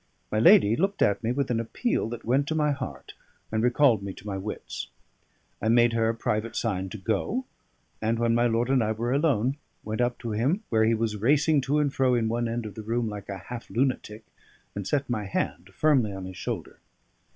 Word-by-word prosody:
My 110 - +1
lady 110 -1 +6
looked 195 +6 +1
at 100 +3 +1
me 115 - +1
with 135 0 -1
an 115 - +1
appeal 115 - -1
that 120 -1 -7
went 135 +5 +2
to 155 - -1
my 150 -1 +2
heart 140 -2 -6 0.4
and 110 0 0
recalled 125 -2 +4
me 100 -1 -5
to 100 - -14
my 100 -2 -3
wits. 95 +3 -5 0.7
I 110 - -1
made 120 0 +5
her 115 -1 +2
a 115 - -1
private 110 0 -2
sign 95 -5 -1
to 110 - -7
go, 110 - -1 0.6
and 110 +1 +1
when 115 0 +2
my 120 +1 +3
lord 120 +2 +1
and 130 -3 +3
I 110 0 0
were 120 +3 -1
alone, 140 -3 +1 0.3
went 110 +3 -2
up 120 0 +1
to 115 - -4
him 135 - 0
where 110 -1 +4
he 115 +1 +3
was 110 -1 -1
racing 145 +6 +3
to 145 - +3
and 145 -2 +1
fro 130 -2 +3
in 115 -2 +1
one 120 +1 0
end 115 0 -3
of 105 - -6
the 110 - -7
room 115 +1 -1
like 105 -1 -8
a 100 - -4
half 120 +6 -8
lunatic, 115 -2 -1 0.5
and 100 -2 -5
set 140 -2 0
my 110 -4 -2
hand 95 - -3
firmly 135 -9 +3
on 95 -1 -6
his 95 0 -8
shoulder. - - -5
115 Hz, 220 wpm, -27 LUFS, 110-130 Hz, 0.7 s, lady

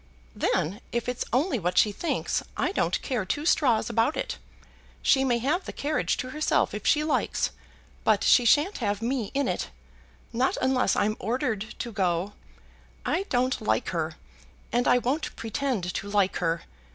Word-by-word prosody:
"Then, 190 +9 0
if 235 0 -2
it's 250 0 -2
only 265 +1 +1
what 180 0 -2
she 210 - +5
thinks, 330 - -1 0.2
I - - +1
don't - - 0
care 245 -7 -1
two 290 +11 -2
straws 260 -9 +3
about 235 +5 +1
it. - - -3 0.6
She 270 - +4
may 245 -3 +2
have 295 +10 0
the - - -5
carriage 300 +2 -1
to 255 -1 -4
herself 305 +3 +1
if 210 0 -4
she 300 0 +4
likes, 310 - 0 0.5
but - - +3
she 250 - +6
shan't 295 - +3
have 205 -2 -1
me 240 -3 -1
in 280 -1 +1
it, - - -2 0.6
not 250 +3 +1
unless 255 -5 +2
I'm 215 +1 +1
ordered 220 -1 -2
to 235 - -4
go. 185 -1 0 0.7
I 390 - 0
don't 255 +1 +1
like - - 0
her, - - -2 0.6
and 245 +1 +1
I - - +6
won't 260 +6 -1
pretend 225 -6 -2
to 200 - -4
like 200 -2 +2
her. 165 -1 -1
245 Hz, 170 wpm, -27 LUFS, 205-275 Hz, 0.7 s, she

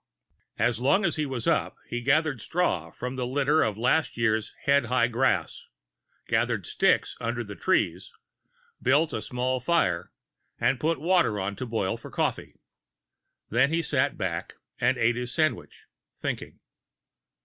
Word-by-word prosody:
As 120 -2 +1
long 190 +11 +3
as 170 - +1
he 150 -1 0
was 130 -4 -4
up, - - +1
he 120 - -3
gathered 140 -1 +2
straw 105 - 0
from 125 +9 -6
the 125 -1 -2
litter 145 +4 +2
of 105 -2 0
last 130 +7 +1
"year's" 110 -2 +1
head 140 -2 +3
high 125 0 +2
grass, 125 +3 0 0.6
gathered - - 0
sticks - - +2
under 120 +1 -2
the 105 -2 -8
trees, - - 0 0.7
built 145 +4 +3
a 110 - -2
small 125 +2 -1
fire 125 - +1 0.5
and 130 - +2
put 165 +2 0
water 165 - +2
on 100 +1 -2
to 130 - -4
boil 110 -5 -1
for - - -11
coffee. - - -2 1.0
Then 130 +6 +3
he 165 0 +1
sat 140 -2 0
back 85 -2 -3 0.2
and - - +2
ate 120 +1 +2
his 125 0 -3
sandwiches, 155 -6 -1 0.3
thinking. - - -5
125 Hz, 150 wpm, -27 LUFS, 115-150 Hz, 1.0 s, long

